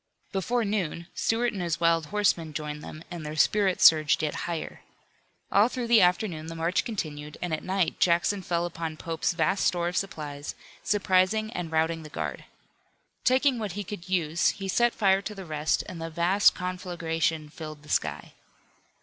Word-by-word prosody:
Before 230 +5 0
noon, 185 -5 -2
Stuart 235 +2 0
and 195 - -4
his 170 -2 -1
wild 165 -2 +2
horsemen 180 -6 +1
joined 150 0 -4
them 155 - -9
and 170 -2 -6
their 150 0 -5
spirits 195 +3 +2
surged 155 -1 +6
yet 150 - 0 0.2
higher. 165 -2 -5 0.7
All 205 +3 +5
through 250 -1 -4
the 230 -2 +6
afternoon 180 -3 +1
the 165 - -6
march 165 +3 0
continued, 150 -9 -5
and 180 -2 -3
at 155 - -2
night 185 -2 0
Jackson 175 +3 +2
fell 175 -1 -1
upon 165 -2 -5
Pope's 165 +1 -1
vast 175 +3 +1
store 175 -1 +1
of 180 - -7
supplies, 150 -6 -4 0.3
surprising 205 +2 +2
and 175 -2 -4
routing 160 +1 +1
the 155 - -10
guard. - - -5 0.8
Taking 260 0 +3
what 210 -5 -3
he 205 +2 -4
could 185 -2 -8
use 170 -2 +2
he 195 -1 -5
set 240 +5 +2
fire 195 -2 +3
to 210 +1 -6
the 195 -1 -8
rest 155 -1 0
and 170 -3 -7
the 165 - -4
vast 175 +5 +4
conflagration 170 -4 -2
filled 155 -2 -8
the - - -16
sky. 75 -1 -1
175 Hz, 175 wpm, -27 LUFS, 160-195 Hz, 0.8 s, surged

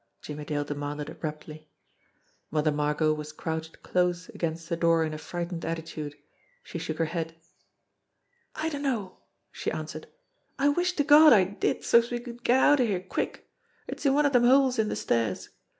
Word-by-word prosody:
Jimmie 150 0 -7
Dale 145 -1 -1
demanded 145 0 -5
abruptly. 155 0 -7 0.8
Mother 155 0 +1
Margot 150 +1 +1
was 150 0 -6
crouched 160 +1 -5
close 180 -1 0
against 165 0 -4
the 170 - -1
door 165 -1 +3
in 155 -1 -3
a 155 - -6
frightened 175 +1 -5
attitude. 160 -3 -5 0.5
She 170 - -6
shook 160 -1 -4
her 165 - +1
head. 165 0 -4 1.2
"I 320 +1 -1
dunno," 265 -10 -3 0.3
she - - -3
answered. - - -6 0.5
"I 280 +1 +3
wish 355 +5 +1
to 295 - +1
Gawd 300 0 +8
I 200 -4 +6
did, 195 +3 -2
so's 235 0 +4
we 240 - -2
could 240 0 -10
get 250 +2 +4
outer 290 -1 +5
here 200 -5 0
quick. 185 - -4 0.4
It's - - -6
in 275 -2 +3
one 295 0 +3
of 285 - +3
dem 245 -2 +4
holes 260 -1 +4
in 215 -1 +2
de - - -2
stairs. 115 -5 -1
170 Hz, 175 wpm, -27 LUFS, 155-245 Hz, 1.2 s, Gawd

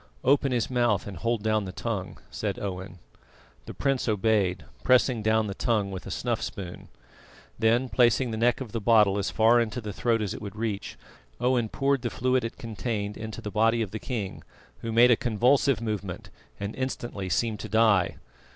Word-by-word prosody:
"Open 140 +1 +3
his 120 -2 +1
mouth 120 -5 +1
and 100 - -7
hold 115 +4 -1
down 110 -2 +1
the 95 - -5
tongue," - - -4
said - - -3
Owen. 95 -1 -5 0.7
The - - -6
prince 135 -2 0
obeyed, 100 -6 +1 0.2
pressing 125 -2 +3
down 110 +1 +2
the 100 - -4
tongue 105 -2 0
with 95 0 -7
a - - -5
snuff 115 +4 -2
spoon. 95 -5 -6 0.7
Then 115 +3 +3
placing 120 0 +3
the - - -2
neck 120 +3 +2
of 120 -5 -6
the 115 - -3
bottle 105 -2 +4
as 100 -1 -1
far 115 +4 +4
into 115 +1 -2
the 105 -3 -6
throat 115 +1 +1
as 105 0 -2
it - - -8
would 100 -2 -7
reach, 110 -2 -4 0.4
Owen 125 -3 +1
poured 135 0 +1
the 120 - -2
fluid 130 +2 +1
it 115 - -5
contained 110 -2 -4
into 110 0 -7
the 105 - -5
body 115 +3 +2
of 100 - -6
the 110 - -5
king, 105 -7 -4 0.4
who 115 - -4
made 120 +2 +6
a - - +7
convulsive 125 +3 +2
movement 100 -5 -4 0.3
and 100 +1 -4
instantly 120 -7 -4
seemed 110 +4 0
to 110 - -6
die. 105 -4 +3
110 Hz, 190 wpm, -27 LUFS, 100-120 Hz, 0.7 s, a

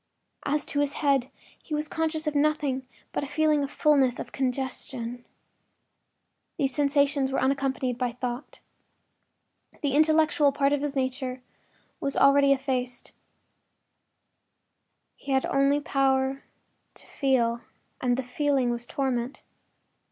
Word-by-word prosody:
As 290 +1 0
to 285 - -2
his 290 -1 +1
head, 275 -2 +3 0.3
he 305 - -4
was 300 +1 -1
conscious 320 0 -2
of 300 - 0
nothing 285 -3 0 0.2
but - - -2
a - - -4
feeling 300 0 +2
of 275 - -3
fullness—of 275 -5 +2
congestion. 250 -2 -3 1.3
These 270 -2 0
sensations 280 -1 +2
were 270 - 0
unaccompanied 265 -2 0
by 250 -2 -1
thought. 250 +1 -6 1.2
The 280 -2 +1
intellectual 310 -1 +4
part 280 0 +2
of 290 - 0
his 290 -1 -3
nature 260 -1 -2 0.6
was 275 - -1
already 275 0 +5
effaced; 260 -2 -1 2.1
he 275 - -4
had 265 - +3 0.4
power 265 -2 +2
only 270 +1 -6 0.5
to - - -12
feel, 240 -4 +1 0.4
and 250 0 0
feeling 265 -1 +1
was 240 0 -4
torment. 260 -2 -2
275 Hz, 120 wpm, -27 LUFS, 255-290 Hz, 2.1 s, already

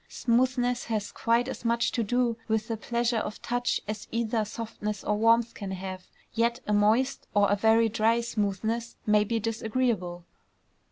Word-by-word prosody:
Smoothness 245 0 +1
has 215 -3 -2
quite 235 +2 +1
as 265 - -6
much 235 0 +1
to 235 - -1
do 245 +1 +1
with 220 0 0
the 225 - 0
pleasure 235 +1 0
of 215 - -5
touch 245 0 0
as 215 0 -5
either 230 -1 0
softness 210 -2 -5
or 210 - +1
warmth 230 +2 +3
can 200 -3 -6
have; 185 0 -6 0.3
yet 235 +2 +1
a 210 - 0
moist 220 +6 +2
or 205 -1 +4
a - - +4
very 225 +2 +4
dry 225 +2 +2
smoothness 220 +1 -2
may 210 -1 +4
be 225 +2 -1
disagreeable. 220 -5 -1
225 Hz, 165 wpm, -28 LUFS, 210-235 Hz, 0.3 s, or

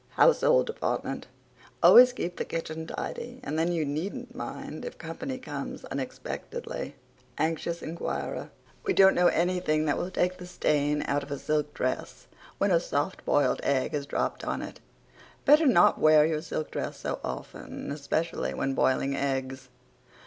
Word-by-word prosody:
HOUSEHOLD - - +5
DEPARTMENT 460 - -3 0.6
Always 250 +1 +9
keep 175 -8 -4
the - - -1
kitchen 160 -1 -5
tidy 245 +1 -5
and 160 -10 -2
then 165 +2 +2
you 165 -3 0
needn't 155 +8 -4
mind - - -6
if 485 - -7
company 255 +12 -5
comes 255 - -6
unexpectedly. 480 - -5 0.4
ANXIOUS 165 +1 -1
INQUIRER: 165 +2 -4 0.3
We 400 -3 +1
don't 195 0 +7
know 175 0 +4
anything 170 -3 +1
that 145 - +1
will 180 - -2
take 185 0 0
the 180 - -8
stain 150 -4 +1
out 145 +1 0
of 140 - -9
a 140 - -3
silk 150 +1 -1
dress 130 0 -3 0.3
when 200 - +2
a 170 - +5
soft 150 +2 -2
boiled 145 - +2
egg 130 -2 0
is 145 -1 -2
dropped - - -2
on - - -2
it. - - -8 0.7
Better 300 +2 +6
not 175 -9 +5
wear 155 -1 +6
your 155 -1 0
silk 155 -1 -4
dress - - -4
so - - -3
often, 65 - -6
especially 155 +3 -2
when 135 - -1
boiling 135 +1 +1
eggs. 135 -1 -2
160 Hz, 155 wpm, -28 LUFS, 145-185 Hz, 0.7 s, Always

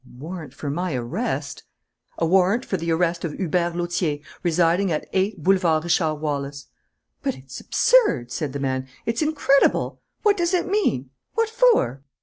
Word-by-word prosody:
"A 125 -1 -17
warrant 160 +1 -7
for 145 - -5
my 175 0 -2
arrest?" 120 -1 -3 0.6
"A 165 - +1
warrant 190 +7 +3
for - - -2
the 170 -2 -3
arrest 170 +1 +1
of 165 -4 -3
Hubert 175 -1 -1
Lautier, 175 -3 -1 0.2
residing 175 +2 +2
at 155 - -2
8 190 -3 0
Boulevard 175 -4 +3
Richard 165 -2 +1
Wallace." 140 -2 -4 0.5
"But - - -2
it's 130 0 -10
absurd!" 420 - +3
said 145 0 -3
the 140 - -3
man. 130 -1 -2 0.2
"It's 230 +4 -1
incredible! 295 -3 +2 0.2
What 415 -1 +4
does 345 +1 +1
it 350 - +1
mean? 255 - 0 0.2
What 455 -1 +1
for?" 455 - +3
170 Hz, 160 wpm, -23 LUFS, 145-200 Hz, 0.6 s, What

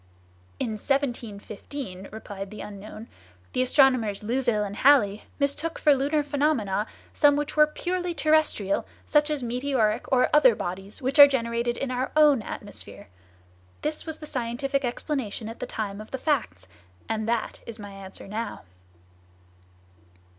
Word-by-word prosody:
"In - - -1
1715," 235 -4 -3
replied 200 -2 -7
the 215 - -8
unknown, 210 +2 -9 0.5
"the 255 - +1
astronomers 255 -6 +3
Louville 235 -2 +1
and 205 0 -5
Halley 230 -7 +4
mistook 295 +3 -1
for 295 - +5
lunar 285 +3 +1
phenomena 280 -9 0 0.3
some 290 -2 +5
which 295 0 -2
were 300 0 +6
purely 355 +2 -3
terrestrial, 305 -10 +2 0.2
such 295 0 +3
as 295 -4 -2
meteoric 240 -2 0
or 255 -1 +4
other 260 -6 +6
bodies 195 +7 -5
which 270 +4 0
are 285 - +13
generated 235 -2 -1
in 275 -2 -3
our 255 +1 -2
own 295 -5 +6
atmosphere. - - -8 0.7
This 305 +2 -2
was 320 -1 -4
the 305 - -9
scientific 270 +1 -2
explanation 245 -3 -3
at 225 - -8
the - - -4
time 205 -1 -4
of 215 - -11
the 265 - -4
facts; 235 - -1 0.4
and 220 0 -2
that 235 -1 -1
is 230 -1 -4
my 205 -2 -9
answer 195 -1 -10
now." 220 +3 -4
245 Hz, 145 wpm, -26 LUFS, 215-285 Hz, 0.7 s, are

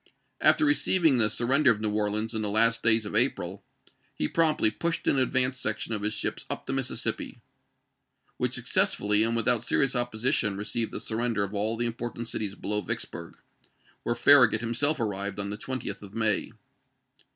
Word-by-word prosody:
After 310 - +4
receiving 180 - +3
the 110 -2 +6
sur 120 - -2
render 140 +2 +4
of 110 -3 +2
New 110 -1 -1
Orleans 105 +2 -1
in 110 - -1
the 105 - 0
last 115 +2 +3
days 115 -1 +3
of 105 - -6
April, 100 -5 +1 0.5
he 75 - -1
promptly 155 - +2
pushed 170 +9 -3
an 135 - +2
advance 130 0 0
section 110 -1 -2
of 105 - -3
his 105 +1 -1
ships - - -3
up - - -4
the - - -3
Mississippi, - - -3 1.0
which - - -1
successively, 105 +1 +1
and 115 +1 +1
without 115 0 +1
serious 135 +2 0
opposition, 120 -3 0
received 105 +2 -2
the - - -5
surrender 115 -2 -2
of 100 +1 -5
all 110 +3 -1
the 120 - -1
important 120 0 -5
cities 105 -3 -4
below 105 0 -2
Vicksburg, 85 -4 -6 0.6
where 120 - -2
Farragut 120 -3 +5
himself 135 +6 +1
arrived 100 -2 -3
on 100 0 -3
the - - -3
20th 130 +1 -5
of 100 +1 -12
May. 110 -2 0
115 Hz, 175 wpm, -27 LUFS, 105-125 Hz, 1.0 s, the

